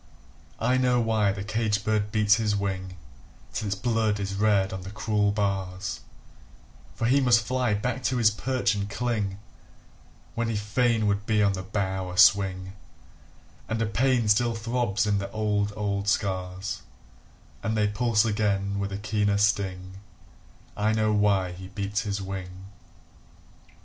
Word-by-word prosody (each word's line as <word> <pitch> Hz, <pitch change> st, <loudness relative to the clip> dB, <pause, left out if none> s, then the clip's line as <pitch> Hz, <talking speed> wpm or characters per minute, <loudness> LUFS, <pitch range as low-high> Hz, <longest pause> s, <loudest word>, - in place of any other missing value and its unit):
I 130 Hz, +1 st, +2 dB
know 125 Hz, -1 st, +3 dB
why 110 Hz, -3 st, +2 dB
the 95 Hz, 0 st, -5 dB
caged 105 Hz, -1 st, -1 dB
bird 105 Hz, -1 st, 0 dB
beats 105 Hz, -1 st, +4 dB
his 105 Hz, -2 st, 0 dB
wing 95 Hz, -2 st, -3 dB, 0.6 s
Till 110 Hz, -, -3 dB
its 100 Hz, -, -1 dB
blood 110 Hz, -1 st, 0 dB
is 100 Hz, 0 st, -3 dB
red 100 Hz, -1 st, +2 dB
on 95 Hz, -, -5 dB
the 95 Hz, -, -8 dB
cruel 105 Hz, 0 st, 0 dB
bars; 95 Hz, -2 st, -2 dB, 1.0 s
For 115 Hz, -, -2 dB
he 135 Hz, +4 st, +4 dB
must 120 Hz, -3 st, +4 dB
fly 125 Hz, -3 st, 0 dB
back 125 Hz, +4 st, -2 dB
to 125 Hz, +1 st, +1 dB
his 110 Hz, -3 st, +4 dB
perch 125 Hz, +1 st, 0 dB
and 100 Hz, -1 st, -3 dB
cling 105 Hz, -4 st, -2 dB, 1.0 s
When 115 Hz, 0 st, -1 dB
he 115 Hz, -, -1 dB
fain 110 Hz, +2 st, +1 dB
would 100 Hz, 0 st, 0 dB
be 105 Hz, -2 st, +3 dB
on 100 Hz, -1 st, +3 dB
the 95 Hz, -, -4 dB
bough 95 Hz, -1 st, -3 dB
a 90 Hz, -, -7 dB
swing; 95 Hz, -1 st, +4 dB, 1.0 s
And 110 Hz, -, -1 dB
a 115 Hz, -, +1 dB
pain 120 Hz, +2 st, +1 dB
still 115 Hz, +3 st, +3 dB
throbs 115 Hz, -1 st, 0 dB
in 105 Hz, -1 st, +1 dB
the 100 Hz, 0 st, -4 dB
old, 105 Hz, -1 st, 0 dB
old 100 Hz, -1 st, -2 dB
scars 95 Hz, -1 st, -2 dB, 0.8 s
And 110 Hz, +2 st, -1 dB
they 105 Hz, -1 st, +3 dB
pulse 110 Hz, +1 st, +2 dB
again 100 Hz, -2 st, 0 dB
with 100 Hz, 0 st, -3 dB
a 100 Hz, -, -3 dB
keener 105 Hz, -1 st, 0 dB
sting 95 Hz, -2 st, 0 dB, 0.8 s
I 105 Hz, +1 st, +1 dB
know 110 Hz, -1 st, +1 dB
why 100 Hz, -3 st, +2 dB
he 90 Hz, +1 st, -9 dB
beats 100 Hz, +2 st, -3 dB
his 100 Hz, -2 st, -3 dB
wing! 95 Hz, -1 st, -7 dB
105 Hz, 160 wpm, -26 LUFS, 100-110 Hz, 1.0 s, beats